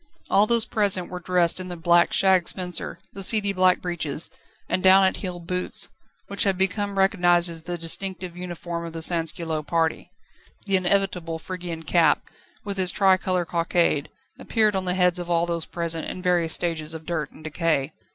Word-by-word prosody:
All 205 Hz, +2 st, +4 dB
those 235 Hz, -1 st, +3 dB
present 195 Hz, -5 st, +1 dB
were 180 Hz, -, -5 dB
dressed 180 Hz, -1 st, +1 dB
in 185 Hz, -, -6 dB
the 175 Hz, -, -6 dB
black 170 Hz, +1 st, +3 dB
shag 190 Hz, -3 st, +3 dB
spencer, 180 Hz, -2 st, -2 dB, 0.2 s
the 195 Hz, -, -7 dB
seedy 200 Hz, 0 st, +3 dB
black 185 Hz, -1 st, +2 dB
breeches, 165 Hz, -4 st, 0 dB, 0.4 s
and 185 Hz, -, -1 dB
down 190 Hz, +1 st, +6 dB
at 190 Hz, -, 0 dB
heel 180 Hz, -2 st, -5 dB
boots, 180 Hz, +2 st, 0 dB, 0.4 s
which 200 Hz, -, -2 dB
had 195 Hz, -2 st, +1 dB
become 195 Hz, +1 st, -1 dB
recognised 175 Hz, -3 st, +3 dB
as 165 Hz, -1 st, -7 dB
the 175 Hz, +1 st, -5 dB
distinctive 180 Hz, +1 st, -2 dB
uniform 175 Hz, -1 st, -6 dB
of 165 Hz, -1 st, -7 dB
the 165 Hz, -1 st, +1 dB
sansculotte 165 Hz, -2 st, -1 dB
party. 165 Hz, -2 st, -1 dB, 0.6 s
The 195 Hz, -1 st, +1 dB
inevitable 180 Hz, -3 st, 0 dB
Phrygian 175 Hz, -1 st, -7 dB
cap, 165 Hz, +1 st, +2 dB, 0.4 s
with 200 Hz, -1 st, -4 dB
its 185 Hz, -1 st, +4 dB
tricolour 185 Hz, -2 st, +2 dB
cockade, 170 Hz, -3 st, 0 dB, 0.3 s
appeared 215 Hz, -3 st, +1 dB
on 190 Hz, -1 st, -1 dB
the 180 Hz, 0 st, 0 dB
heads 180 Hz, -1 st, +2 dB
of 175 Hz, 0 st, -6 dB
all 170 Hz, 0 st, +2 dB
those 170 Hz, -2 st, -2 dB
present, 170 Hz, -1 st, -3 dB
in -, -, -6 dB
various 175 Hz, -3 st, +1 dB
stages 165 Hz, -2 st, -2 dB
of 160 Hz, 0 st, -9 dB
dirt 160 Hz, -3 st, -3 dB
and 155 Hz, -, -16 dB
decay. 155 Hz, -2 st, -1 dB
175 Hz, 180 wpm, -24 LUFS, 165-190 Hz, 0.6 s, down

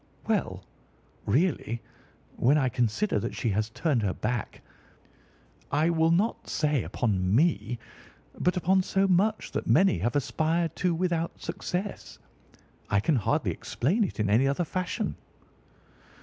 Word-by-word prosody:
"Well, -, -, -1 dB, 0.6 s
really, 130 Hz, -, +1 dB, 0.6 s
when 135 Hz, +5 st, +3 dB
I 135 Hz, -4 st, +2 dB
consider 120 Hz, -, 0 dB
that 115 Hz, +4 st, -4 dB
she 120 Hz, -, -1 dB
has 105 Hz, +2 st, 0 dB
turned 135 Hz, +1 st, 0 dB
her 100 Hz, -3 st, -1 dB
back—I 135 Hz, +6 st, -5 dB
will 160 Hz, -1 st, +3 dB
not 195 Hz, +8 st, 0 dB
say 150 Hz, -4 st, +1 dB
upon 95 Hz, -4 st, 0 dB
me, 120 Hz, -, +2 dB, 0.6 s
but 180 Hz, +1 st, +1 dB
upon 190 Hz, +2 st, +3 dB
so 195 Hz, +1 st, +1 dB
much 200 Hz, +4 st, +1 dB
that -, -, -3 dB
many 190 Hz, -, +4 dB
have 120 Hz, -, -1 dB
aspired 160 Hz, +3 st, 0 dB
to 180 Hz, -2 st, +1 dB
without 170 Hz, -1 st, -1 dB
success—I 180 Hz, -, -5 dB
can 140 Hz, +9 st, +2 dB
hardly 105 Hz, -, 0 dB
explain 180 Hz, -, 0 dB
it 185 Hz, -, -4 dB
in 105 Hz, -, +1 dB
any 115 Hz, +7 st, +3 dB
other 140 Hz, +6 st, 0 dB
fashion." 185 Hz, +6 st, -2 dB
150 Hz, 130 wpm, -27 LUFS, 115-180 Hz, 0.6 s, many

